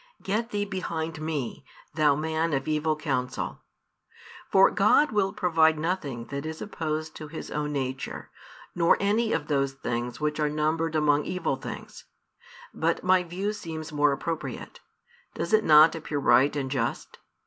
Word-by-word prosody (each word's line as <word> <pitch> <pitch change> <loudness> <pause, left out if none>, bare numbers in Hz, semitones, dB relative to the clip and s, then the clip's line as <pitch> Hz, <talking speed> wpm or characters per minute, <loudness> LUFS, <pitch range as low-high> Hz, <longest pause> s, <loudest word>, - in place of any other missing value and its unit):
Get 220 +4 -1
thee 205 -2 -1
behind 165 -5 -4
me, 150 -6 -3 0.3
thou 150 -2 +3
man 160 +2 -1
of 135 -1 -1
evil 155 0 +1
counsel! 135 -5 -3 0.9
For 195 0 +6
God 210 +9 +4
will 200 -3 +1
provide 165 -5 +3
nothing 150 -8 -3
that 140 0 -3
is 160 0 -6
opposed 155 -5 -4
to 155 - -8
His 160 +2 -8
own 150 0 -2
Nature, 135 -1 -4 0.4
nor 170 -1 +4
any 220 +3 +1
of 150 - 0
those 140 -2 0
things 120 -2 -4
which 150 0 -1
are 150 -1 +2
numbered 155 +2 0
among 150 -1 +3
evil 180 -6 -1
things. 135 - -9 0.7
But 165 +1 0
my 185 0 +4
view 185 +4 -3
seems 160 -5 -7
more 145 0 +3
appropriate: 160 +3 -5 0.6
does - - -3
it 215 0 +5
not 155 -1 +7
appear 155 -2 -4
right 140 0 +4
and 135 -2 -2
just? 120 -4 -3
155 Hz, 155 wpm, -27 LUFS, 145-170 Hz, 0.9 s, not